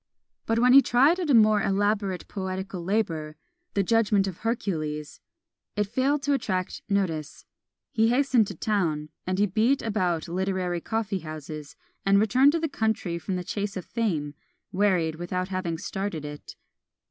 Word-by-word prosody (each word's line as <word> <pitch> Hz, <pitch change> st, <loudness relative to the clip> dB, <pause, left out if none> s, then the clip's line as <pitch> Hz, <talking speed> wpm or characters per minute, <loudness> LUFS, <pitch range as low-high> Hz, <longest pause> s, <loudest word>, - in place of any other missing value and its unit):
But 225 Hz, -, +1 dB
when 250 Hz, +2 st, +5 dB
he 275 Hz, -, +10 dB
tried 275 Hz, +9 st, +4 dB
at 345 Hz, -4 st, -2 dB
a 270 Hz, -, +5 dB
more 215 Hz, -2 st, +5 dB
elaborate 200 Hz, -1 st, 0 dB
poetical 190 Hz, -2 st, -4 dB
labour, 165 Hz, -6 st, -1 dB, 0.4 s
"The 200 Hz, -, +3 dB
Judgment 210 Hz, -1 st, +3 dB
of 190 Hz, -3 st, -5 dB
Hercules," 155 Hz, -10 st, -3 dB, 0.5 s
it 210 Hz, -, +2 dB
failed 265 Hz, +7 st, 0 dB
to 285 Hz, -, +2 dB
attract 185 Hz, -8 st, -2 dB
notice. 165 Hz, -7 st, -2 dB, 0.5 s
He 225 Hz, 0 st, +3 dB
hastened 250 Hz, -3 st, +3 dB
to 195 Hz, -, -6 dB
town, 160 Hz, -6 st, -1 dB, 0.2 s
and 185 Hz, 0 st, 0 dB
he 205 Hz, -, +4 dB
beat 220 Hz, +8 st, +1 dB
about 185 Hz, -6 st, 0 dB
literary 180 Hz, -1 st, -1 dB
coffee 220 Hz, -2 st, -2 dB
houses; 155 Hz, -2 st, -8 dB, 0.3 s
and 200 Hz, 0 st, +4 dB
returned 255 Hz, +7 st, +4 dB
to 335 Hz, -, +1 dB
the 325 Hz, -, 0 dB
country 220 Hz, -, -1 dB
from 185 Hz, +2 st, -3 dB
the 180 Hz, -, -3 dB
chase 200 Hz, +2 st, -3 dB
of 185 Hz, -, -6 dB
Fame, 170 Hz, -11 st, -2 dB, 0.4 s
wearied 180 Hz, -5 st, +1 dB
without 180 Hz, +2 st, -3 dB
having 185 Hz, -3 st, -2 dB
started 185 Hz, -3 st, -4 dB
it. 145 Hz, 0 st, -9 dB
195 Hz, 160 wpm, -26 LUFS, 175-225 Hz, 0.5 s, he